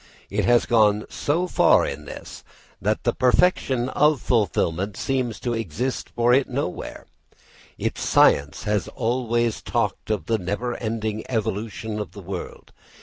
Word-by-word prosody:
It - - 0
has 120 -1 +4
gone 105 -2 +3
so 165 +5 0
far 180 - +4
in - - -5
this - - -9 0.4
that 105 +3 0
the 120 - +1
perfection 130 -2 +2
of 150 +1 +3
fulfilment 100 -3 0
seems 130 -4 -1
to 120 - -1
exist 115 - -3
for 120 +1 +2
it 135 +1 +3
nowhere. 125 -8 -4 0.7
Its - - -3
science 70 0 +3
has 105 -2 0
always 120 -2 -1
talked - - -2
of 110 -2 -1
the 115 -1 0
never 105 +7 -2
ending 110 -1 -3
evolution 110 -1 -3
of 95 -5 -5
the 100 - -9
world. 90 0 -7
115 Hz, 145 wpm, -24 LUFS, 105-125 Hz, 0.7 s, has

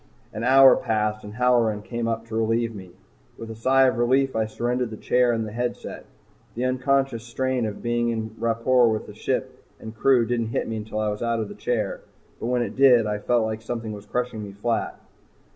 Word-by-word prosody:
An 110 - -5
hour 135 +1 +7
passed 110 -2 -1
and 105 0 -9
Halloran 120 -4 +2
came 120 0 -3
up 115 0 -2
to 115 -1 -7
relieve 115 +1 0
me. 95 -3 -10 0.5
With 115 0 -8
a - - -7
sigh 130 +4 +3
of 125 -3 +1
relief 130 +3 +2
I 110 -1 +1
surrendered 120 +2 -2
the 110 - -8
chair 125 +2 +2
and 115 -2 -1
headset. 120 +3 -5 0.5
The 125 +2 -1
unconscious 130 -2 0
strain 125 0 -1
of 105 - -7
being 120 0 0
in 110 -1 -3
rapport 115 +1 +3
with 110 -1 -4
ship - - -3 0.2
and 110 0 -9
crew 125 +1 +3
didn't 115 -1 -1
hit 115 - -2
me 115 - -3
until 110 0 -6
I 110 0 0
was 105 0 -4
out 115 -1 0
of 110 -2 -3
the - - -7
chair. 110 -5 -2 0.4
But - - -4
when 125 0 +1
it - - -6
did, 125 -4 +6
I 105 0 -2
felt 120 +1 +1
like 110 0 -4
something 115 -1 -5
was 105 0 -10
crushing 125 -2 -3
me 100 -1 -8
flat. 115 +3 -2
115 Hz, 210 wpm, -24 LUFS, 110-125 Hz, 0.5 s, hour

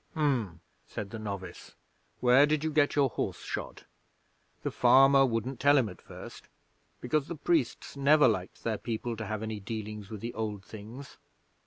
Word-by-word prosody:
'"H'm!" 125 - 0 0.3
said 100 -2 -6
the 115 - -6
novice. 100 -4 -7 0.5
"Where 125 +4 +6
did 150 0 0
you 160 - 0
get 145 -1 +2
your 140 -2 +4
horse 120 - -4
shod?" - - -6 0.8
'The - - -2
farmer 135 +2 +6
wouldn't 115 +2 -2
tell 145 +1 +5
him 125 -5 +3
at 90 - -12
first, - - -11 0.5
because 140 +4 0
the 170 - -5
priests 155 -4 -1
never 145 +1 +5
liked 95 -5 -2
their 110 -2 -1
people 115 0 -3
to 115 -1 -5
have 110 +1 -3
any 110 -1 -4
dealings 105 -1 -6
with 110 -3 -7
the 115 +1 -5
Old 105 -3 -4
Things. 115 +6 -10
120 Hz, 170 wpm, -29 LUFS, 105-140 Hz, 0.8 s, Where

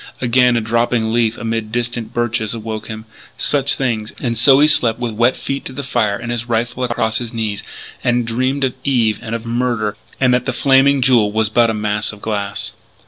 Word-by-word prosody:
Again 125 0 +3
a - - +1
dropping 115 0 0
leaf 115 -1 +1
amid 115 -1 -3
distant 120 -1 -3
birches 115 -2 -1
awoke 110 -1 -6
him. 110 0 -7 0.3
Such 140 -1 +1
things. 115 -5 -2
And 120 -2 -2
so 135 +4 +6
he 150 - +6
slept 120 -7 +3
with 120 -2 -3
wet 120 +4 +2
feet 140 0 -4
to 130 - -6
the 140 +2 -5
fire 105 -6 0
and 120 +1 -5
his 120 0 -3
rifle 120 +2 -1
across 110 -2 0
his 120 -1 -6
knees; 110 -3 -2 0.4
and 120 0 +1
dreamed 130 +4 -1
of 130 -2 +1
Eve 120 -6 +1
and 115 +1 -4
of 115 0 -6
murder, 115 -3 -1 0.2
and 125 -2 +3
that 125 - 0
the 130 - 0
Flaming 135 +1 +4
Jewel 120 -5 +4
was 110 0 +1
but 115 +1 +3
a 110 - -1
mass 105 0 -1
of 105 - -13
glass. 100 -2 -4
115 Hz, 205 wpm, -18 LUFS, 110-125 Hz, 0.4 s, so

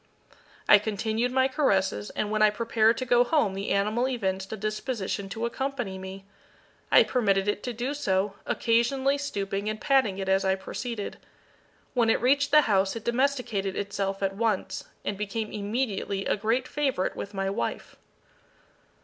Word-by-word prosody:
I 205 - +8
continued 220 +3 -1
my 260 +1 +3
caresses, 195 - +1
and 210 - -1
when 215 0 0
I 215 - +7
prepared 225 +1 +2
to 255 - -3
go 245 0 +5
home 245 -7 +1
the 195 +1 -4
animal 215 +5 +1
evinced 190 -6 -2
a 220 - -4
disposition 215 -1 -3
to 225 +4 -3
accompany 245 -6 -3
me. 190 +1 -8 0.7
I - - +8
permitted 200 -5 +1
it 205 0 0
to 250 - -3
do 245 +4 -3
so, 195 -8 0
occasionally 265 +4 +1
stooping 200 -6 -3
and 215 0 -4
patting 260 -9 +2
it 195 -1 -4
as 190 0 +3
I 190 0 +2
proceeded. 210 +3 -5 0.8
When 235 -3 +2
it - - +3
reached 280 +4 +3
the 300 +1 +7
house 195 -5 +1
it 230 - -7
domesticated 235 -6 0
itself 195 -1 -2
at 195 0 0
once, 220 -2 -1 0.2
and 200 -1 -3
became 210 +1 -3
immediately 205 -2 -2
a - - +1
great 225 +5 0
favourite 275 -10 -1
with 200 0 -6
my 195 0 -1
wife. 115 -12 -4
215 Hz, 165 wpm, -27 LUFS, 195-245 Hz, 0.8 s, I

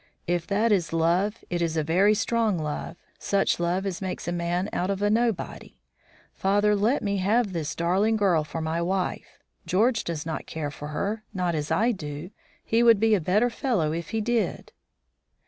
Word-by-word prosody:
If 175 -1 -1
that 215 +4 +2
is 175 -6 +1
love, 175 +6 +1
it 175 -1 -1
is 165 -1 0
a 155 - +1
very 190 +7 +3
strong 225 -3 +1
love; 155 +1 -4 0.2
such 200 -3 +1
love 175 +3 0
as 190 -2 -3
makes 185 -3 -4
a - - 0
man 175 +2 -1
out 180 - -1
of 200 0 -1
a 205 - +3
nobody. 230 -3 -1 0.6
Father, 205 +2 +2
let 220 +7 +1
me 200 -1 0
have 205 +2 +1
this 160 -4 -3
darling 190 +6 +2
girl 185 -7 +3
for 160 +2 -5
my 160 +1 -1
wife. 185 +1 -2 0.3
George 220 +5 +2
does 160 -3 -4
not 160 -1 -4
care 150 -2 -4
for 145 +1 -8
her, 200 +8 -3
not 180 -2 0
as 150 -1 -2
I 215 +9 +2
do. 155 -3 -6 0.3
He 225 +1 +2
would 230 -3 +6
be 220 +1 +3
a 200 - +3
better 210 +9 +2
fellow 220 - 0
if 165 0 -4
he 225 - -1
did." 225 -4 -1
185 Hz, 190 wpm, -26 LUFS, 165-210 Hz, 0.6 s, would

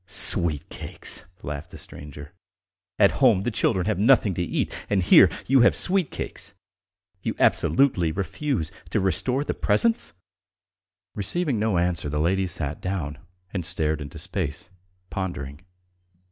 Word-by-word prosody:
"Sweet 85 -6 +4
cakes!" - - -6 0.2
laughed 70 0 -6
the - - -11
stranger. 75 +2 -9 0.6
"At - - +5
home 115 -8 +5
the 120 - -1
children 95 -4 +1
have 105 -2 -1
nothing 110 -3 +4
to 90 - -3
eat, 85 - -2 0.2
and 100 -3 +1
here - - +7 0.2
you 135 +1 +4
have 120 - +5
sweet 185 -4 +2
cakes. - - -7 0.7
You - - -3
absolutely 110 - +2
refuse 100 - -2 0.2
to - - 0
restore 125 - +1
the - - -2
presents?" 230 -1 +1 1.0
Receiving 125 - 0
no 105 -3 +1
answer, 85 -3 0
the 75 - -3
lady 95 +4 +1
sat 75 -2 -4
down 90 -6 -4 0.3
and 95 -3 -2
stared 80 -2 0
into 70 -2 -8
space, 75 +5 -3 0.4
pondering. 75 -6 -5
95 Hz, 140 wpm, -24 LUFS, 80-110 Hz, 1.0 s, here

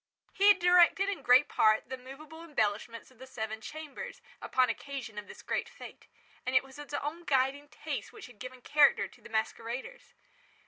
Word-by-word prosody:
He 400 - +3
had 410 -1 +8
directed, 360 +2 +5
in 400 - -3
great 255 +4 +6
part, 215 0 +3
the 260 - -3
movable 280 +5 -11
embellishments 230 -5 -2
of 250 - -23
the 260 - -10
seven 220 -3 -5
chambers, 315 - -8 0.2
upon 255 -1 +2
occasion 265 -8 -5
of 205 - -10
this - - -12
great - - -2
fête; - - -12 0.4
and 255 +1 -2
it 255 - +6
was 270 0 -14
his 295 0 -10
own 295 +5 -4
guiding 275 0 +1
taste - - -5
which 435 - -11
had 245 -5 -15
given 255 +1 -9
character 285 -9 +4
to - - -21
the - - -13
masqueraders. 230 - -4
265 Hz, 185 wpm, -31 LUFS, 240-310 Hz, 0.4 s, had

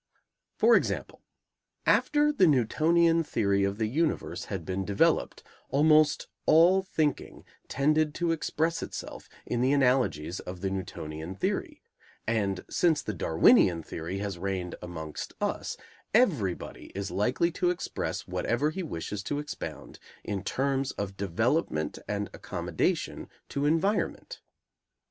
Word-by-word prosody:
For 475 - +6
example, - - -1 0.6
after 295 0 +3
the 190 -11 +5
Newtonian 165 +6 +3
Theory 100 -8 +1
of 100 +1 0
the 110 - 0
universe 150 +8 -1
had - - -5
been 95 +1 -2
developed, 100 +1 +1 0.3
almost 150 +2 +4 0.2
all 175 +4 +6
thinking 155 -6 -2 0.2
tended 150 +2 +1
to 170 -1 0
express 165 0 -1
itself - - -7 0.2
in 120 - -1
the 130 +2 +3
analogies 125 - +1
of 90 0 -8
the 95 -1 -1
Newtonian 85 -2 -5
Theory, - - -3 0.4
and 100 -4 -1
since 165 -4 +2
the 105 - -3
Darwinian 80 0 +4
Theory 85 +5 -5
has 100 -3 -4
reigned 95 -1 -3
amongst 80 -4 -6
us, - - -2 0.4
everybody 145 - +1
is 100 -2 -3
likely 125 - +1
to 180 +1 +1
express 180 - -3
whatever 140 +6 0
he 190 - -4
wishes 105 - -4
to 145 - -2
expound 150 -1 -7 0.2
in 100 -2 -3
terms 135 0 0
of 100 -1 -4
development 100 - 0
and 105 0 -2
accommodation - - -2 0.2
to 140 +1 0
environment. 195 - 0
125 Hz, 125 wpm, -28 LUFS, 95-155 Hz, 0.6 s, For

